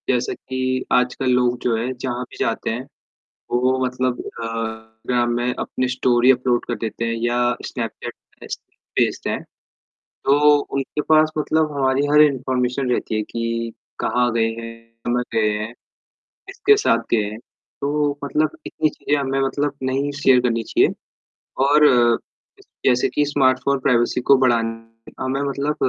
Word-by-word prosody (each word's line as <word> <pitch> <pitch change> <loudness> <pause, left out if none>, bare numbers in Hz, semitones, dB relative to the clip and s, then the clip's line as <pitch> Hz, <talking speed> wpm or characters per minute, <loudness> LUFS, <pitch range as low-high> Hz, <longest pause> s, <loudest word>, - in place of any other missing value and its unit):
जैसा 405 - +1
कि 130 - -7 0.3
आजकल 125 +1 +1
लोग 125 0 +2
जो 120 -2 +1
है, 120 +3 -2
जहाँ 125 0 -4
भी - - -13
जाते 115 - -1
हैं, 120 +4 -3 0.7
वो 130 +2 +2
मतलब 125 0 -1
अ - - -7
इंस्टाग्राम 115 +1 -3
में 120 +1 0
अपनी 130 - -2
स्टोरी 125 0 +4
अपलोड 125 -1 +1
कर 120 - -2
देते 115 +1 -3
हैं, 115 0 -1
या 120 0 +1
स्नैपचैट - - -5 0.3
पे - - -11
स्नेप - - -5
भेजते - - -3
हैं, - - -2 0.6
तो 145 +2 +3 0.2
उनके 140 +2 -2
पास 155 0 +5
मतलब 155 0 +1
हमारी 135 +1 +2
हर 150 0 +7
इन्फॉर्मेशन 130 -2 +1
रहती 115 - -1
है 110 - +1
कि 115 0 -3 0.3
कहाँ 125 0 +1
गए 115 -1 +2
हैं 115 0 -7 0.3
कब 120 0 +1
गए 110 -1 +2
हैं, 110 +2 -5 0.7
किसके 420 0 +3
साथ 115 - +2
गए 115 -2 +3
हैं। 110 - -8 0.4
तो 145 0 0
मतलब 150 +2 +1 0.2
इतनी 155 - 0
चीजें 145 0 -1
हमें 135 -1 -1
मतलब, 140 +1 0
नहीं 135 +2 0
शेयर 130 -2 +6
करनी 115 -2 0
चाहिए - - +2 0.7
और 150 +2 +6 1.0
जैसे 125 -1 +3
कि 150 - +1
स्मार्टफोन 135 -1 +2
प्राइवेसी 120 -1 +2
को 140 - +9
बढ़ान 120 -3 +3 0.5
हमें 130 +1 -1
मतलब 140 +1 -1
125 Hz, 155 wpm, -21 LUFS, 120-140 Hz, 1.0 s, को